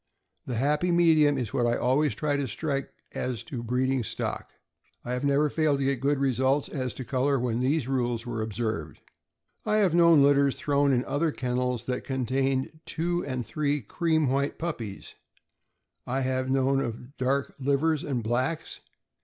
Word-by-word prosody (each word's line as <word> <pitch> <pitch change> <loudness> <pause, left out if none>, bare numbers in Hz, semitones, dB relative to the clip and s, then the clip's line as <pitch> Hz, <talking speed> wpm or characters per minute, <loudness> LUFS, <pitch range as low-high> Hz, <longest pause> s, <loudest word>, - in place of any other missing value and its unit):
The 125 - -2
happy 150 +8 +1
medium 160 -4 +4
is 120 -5 -3
what 120 -2 +2
I 120 - +2
always 140 +4 +1
try 150 -1 0
to 140 -1 -1
strike 140 +2 -3 0.2
as 120 -3 -3
to 130 -5 -6
breed 125 +3 0
ing 130 -2 0
stock. - - -4 0.6
I 125 - -2
have 125 - -2
never 140 +1 +3
failed 150 -1 +1
to 135 - -1
get 135 -2 0
good 145 +1 +2
results 135 +1 +1
as 130 -4 -3
to 130 - -6
color 135 +3 +1
when 120 -1 -1
these 135 +1 +1
rules 120 -3 -1
were 115 -2 -3
observed. 110 - -3 0.6
I 210 - +1
have 200 -6 +3
known 170 -4 +6
litters 140 -1 +4
thrown 140 -1 +1
in 125 -1 +1
other 155 +2 0
kennels 125 -2 -2
that 125 -1 -2
con 130 -2 -2
tained 135 +4 -1
two 175 +2 -1
and 130 -3 -3
three 145 +4 -1
cream 160 - +1
white 140 +2 0
puppies; 120 - -5 0.9
I 130 +2 -1
have 130 0 -1
known 135 0 +2
of 125 +2 -6
dark 135 +2 0
livers 145 +3 +1
and 130 -6 -2
blacks. 130 +8 -2
135 Hz, 175 wpm, -27 LUFS, 125-145 Hz, 0.9 s, known